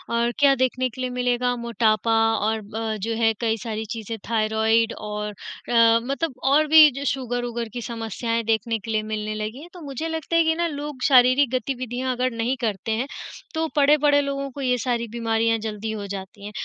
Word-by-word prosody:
और 235 +1 +1
क्या 280 -1 +6
देखने 255 0 0
के 255 +2 -9
लिए 255 - -1
मिलेगा 245 0 0
मोटापा 230 -2 +1 0.2
और 220 +1 -1
ब 220 +1 -4
जो 225 +3 -2
है 225 -1 +3
कई 225 -1 +1
सारी 220 0 -4
चीज़ें, 225 0 -6
थायरॉइड 220 0 +2
और 210 0 -5
अ, 230 +2 +2
मतलब 275 +3 -2
और 295 +3 +4
भी 310 0 +9
जो 275 +2 -6
शुगर-वुगर 245 -3 -2
की 240 - -4
समस्याएँ 230 0 -3
देखने 225 +1 0
के 225 +2 -7
लिए 215 -1 0
मिलने 215 0 -3
लगी 215 +5 -5
है, 330 - -10
तो 355 - -11
मुझे 285 +2 -5
लगता 320 0 -3
है 335 - +5
कि 320 0 +2
ना 340 +1 0
लोग 290 -3 -6
शारीरिक 255 0 +5
गतिविधियाँ 255 0 -2
अगर 255 +1 0
नहीं 230 +3 -1
करते 220 -1 -2
हैं, 230 +5 -1 0.5
तो 320 0 -1
पड़े-पड़े 290 0 +4
लोगों 275 0 -3
को 280 - -8
ये 250 -2 +1
सारी 235 -1 -1
बीमारियाँ 225 -1 +1
जल्दी 220 0 -4
हो 205 -2 -5
जाती 195 +1 -8
हैं। 210 - -6
235 Hz, 195 wpm, -23 LUFS, 220-270 Hz, 0.5 s, भी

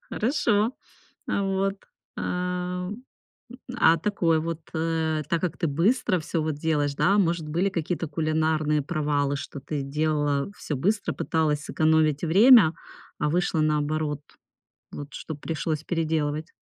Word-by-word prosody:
Хорошо. 225 -2 +1 0.6
А 200 - 0
вот, 195 0 0 0.4
ам, 180 +3 -3 0.7
а 165 +1 +5
такой 165 -2 +1
вот, 165 0 -4
э. 160 -1 0
Так 170 - 0
как 180 -3 -2
ты 170 - 0
быстро 185 - +1
всё 155 +1 -2
вот 155 0 -1
делаешь, 150 -2 0
да, 200 +8 +3
может 170 -4 +1
были 170 +6 +1
какие-то 170 -1 -2
кулинарные 155 -1 0
провалы, 145 -2 0
что 140 0 -7
ты 145 +1 -4
делала 145 0 0
всё 150 - -4
быстро, 200 +10 0
пыталась 155 -2 0
сэкономить 155 -2 +2
время, 195 0 +7 0.4
а - - 0
вышло 175 -1 +1
наоборот, 150 -1 0 0.7
вот 145 0 -8
что 155 - -6
пришлось 155 +1 -3
переделывать? 155 -1 -1
160 Hz, 130 wpm, -25 LUFS, 150-180 Hz, 0.7 s, время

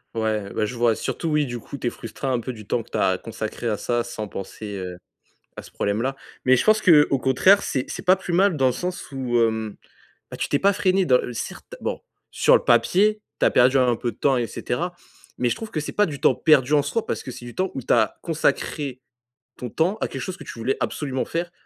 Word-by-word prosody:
Ouais, 110 -3 -1
bah, 110 - 0
je 125 - -5
vois, 120 -1 +2
surtout 165 - -3
oui 150 -1 +2
du 120 -2 -5
coup, 140 - -9
tu 125 - -3
es - - +3
frustré 115 +3 -7
un 130 -2 +1
peu 125 +2 -5
du 110 -3 -11
temps 120 - 0
que - - -17
tu - - -3
as - - +2
consacré 120 - -5
à 110 -2 0
ça, 120 +2 -1
sans 110 -3 -6
penser, 100 +1 -7
heu, 90 -1 -6 0.6
à - - -7
ce - - -15
problème-là. 115 +7 -1 0.3
Mais 130 0 +5
je 120 - 0
pense 215 0 +4
qu'au 150 -7 +5
contraire 185 +11 +4
c'est 130 - -2
c'est - - -6
pas 185 -1 +5
plus 185 -2 -5
mal 185 -1 +3
dans 135 - +2
le - - +3
sens, 180 0 -4
où 125 -3 -1
hem, 110 -2 0 0.6
bah, - - -7
tu - - -2
t'es 145 - +2
pas 200 +5 +4
freiné 190 0 +2
dans 125 -2 +5
le 125 - -4
certes, 115 - -7
bon, - - -3 0.3
sur - - +4
le - - -1
papier, 190 - +3 0.2
tu - - +4
as - - +4
perdu 130 +2 +4
un 125 -2 +3
peu 120 0 -3
de - - -22
temps 135 0 +2
et 120 - 0
cetera 175 +10 -3 0.4
mais 125 - +1
je - - -1
trouve 225 -1 -8
que 155 - -1
c'est 150 - -4
pas 210 - +2
du 145 -5 -6
temps 130 - +4
perdu 150 -2 +4
en 145 - +4
soi, 210 +11 -2
parce - - -3
que 130 - -6
c'est 125 0 -10
du 120 - -10
temps 185 0 -1
où 135 - -4
tu - - 0
as 110 -2 +2
consacré 150 -4 -1 0.6
ton 125 - -6
temps 170 - +1
à - - -1
quelque - - -6
chose 185 -1 -4
que - - -11
tu - - -9
voulais 125 +4 0
absolument 135 -3 -2
faire 170 +1 -3
130 Hz, 260 wpm, -23 LUFS, 120-165 Hz, 0.6 s, Mais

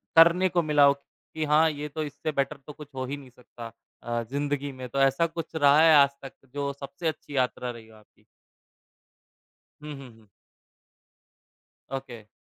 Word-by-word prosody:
करने 170 +3 +6
को 175 -1 +2
मिला 150 -2 +3
हो 140 - +6
कि 155 +2 -9
हाँ, 155 +2 +4
ये 150 0 -5
तो 155 +2 -4
इससे 145 +1 -4
बेटर 140 +1 -1
तो 150 - -8
कुछ 150 -1 -12
हो 130 0 -3
ही 140 +3 -4
नहीं 135 -2 -13
सकता 120 -2 -12 0.3
अ, 120 0 -2
जिंदगी 145 0 -2
में, 130 -1 -8
तो 140 - -2
ऐसा 135 +5 +3
कुछ 165 0 -7
रहा 145 0 +5
है 160 -1 +7
आजतक 140 -1 +3 0.2
जो 140 -1 -2
सबसे 140 +4 -5
अच्छी 150 -2 -5
यात्रा 125 -1 0
रही 115 -2 -12
हो 110 - -18
आपकी? 105 - -25 1.6
हुँ, 150 - -6
हुँ, 135 -2 -11
हुँ। 110 - -22 1.6
ओके। 120 -5 -7
140 Hz, 175 wpm, -27 LUFS, 130-150 Hz, 1.6 s, है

